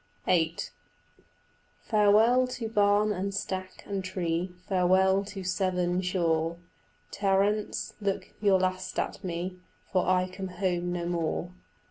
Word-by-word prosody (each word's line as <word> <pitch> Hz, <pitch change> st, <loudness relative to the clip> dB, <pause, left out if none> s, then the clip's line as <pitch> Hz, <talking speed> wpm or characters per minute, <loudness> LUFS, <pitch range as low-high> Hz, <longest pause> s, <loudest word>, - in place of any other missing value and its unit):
VIII 165 Hz, -2 st, +2 dB, 1.3 s
"Farewell 220 Hz, +4 st, +4 dB
to 250 Hz, -2 st, -4 dB
barn 210 Hz, -1 st, +3 dB
and 195 Hz, 0 st, -2 dB
stack 185 Hz, -1 st, -4 dB
and 195 Hz, -2 st, -3 dB
tree, 180 Hz, -1 st, -2 dB, 0.2 s
Farewell 190 Hz, +1 st, +3 dB
to 195 Hz, -1 st, -7 dB
Severn 180 Hz, -1 st, 0 dB
shore. 170 Hz, -3 st, 0 dB, 0.5 s
Terence, 200 Hz, +1 st, 0 dB
look 200 Hz, -1 st, -2 dB
your 200 Hz, -3 st, +4 dB
last 185 Hz, 0 st, -2 dB
at -, -, -2 dB
me, 180 Hz, +1 st, -4 dB, 0.3 s
For 185 Hz, -2 st, +1 dB
I 185 Hz, 0 st, +3 dB
come 190 Hz, +1 st, -6 dB
home 180 Hz, -1 st, -1 dB
no 175 Hz, -1 st, -2 dB
more. 170 Hz, 0 st, -2 dB
185 Hz, 120 wpm, -28 LUFS, 180-200 Hz, 1.3 s, Farewell